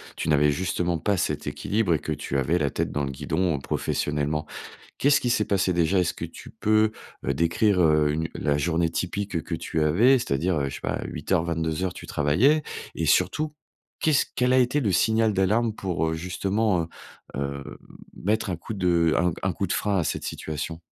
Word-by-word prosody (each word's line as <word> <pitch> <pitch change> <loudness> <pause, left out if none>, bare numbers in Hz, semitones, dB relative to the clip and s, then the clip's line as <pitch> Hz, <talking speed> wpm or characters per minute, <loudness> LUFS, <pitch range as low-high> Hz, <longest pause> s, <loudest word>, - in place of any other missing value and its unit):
tu 80 - -3
n'avais 75 0 +4
justement 85 +1 -1
pas 100 +4 0
cet - - -2
équilibre 105 -5 0
et 75 - +1
que 80 - -5
tu 70 -1 -2
avais 80 +7 +1
la 75 -4 0
tête - - -2
dans 75 - -1
le 70 - -2
guidon 80 +2 -1
professionnellement, 75 +2 -1 0.5
qu'est-ce 145 +1 +4
qui 125 - 0
s'est 105 - +2
passé 95 -2 +1
déjà? 85 +2 +2
Est-ce 90 - +1
que - - -4
tu - - -12
peux, 110 0 +2 0.3
heu, 70 - +1
décrire, 90 +5 +2
heu, 75 -2 +4
une 80 +2 -2
la 70 -1 0
journée 80 +2 +1
typique, 95 +3 -3
heu, 80 - +1
que - - -4
tu 80 - -2
avais? 115 - +5
C'est-à-dire, 85 - 0
heu, 70 -1 -1
je 70 - -6
sais - - -9
pas, - - -2
8:00-22:00, 80 +2 -1
tu - - -10
travaillais 125 - +3 0.3
et - - -1
surtout 155 0 +2 0.5
qu'est-ce 155 -3 +3
quel 125 0 +2
a - - +5
été 125 +4 +2
le 105 -5 +1
signal 110 +4 +3
d'alarme 105 +4 +2
pour, 90 -5 -1
heu, - - -1
justement, 95 +2 0
heu, - - -7 0.5
heu, 70 0 -5 0.4
mettre 110 +2 -1
un 90 - -1
coup 110 - -7
de 85 -4 +2
un 90 0 +2 0.2
un 90 - 0
coup 100 - -2
de - - -1
frein 100 -2 0
à - - +1
cette - - -2
situation? 80 +2 -5
85 Hz, 200 wpm, -25 LUFS, 80-105 Hz, 0.5 s, avais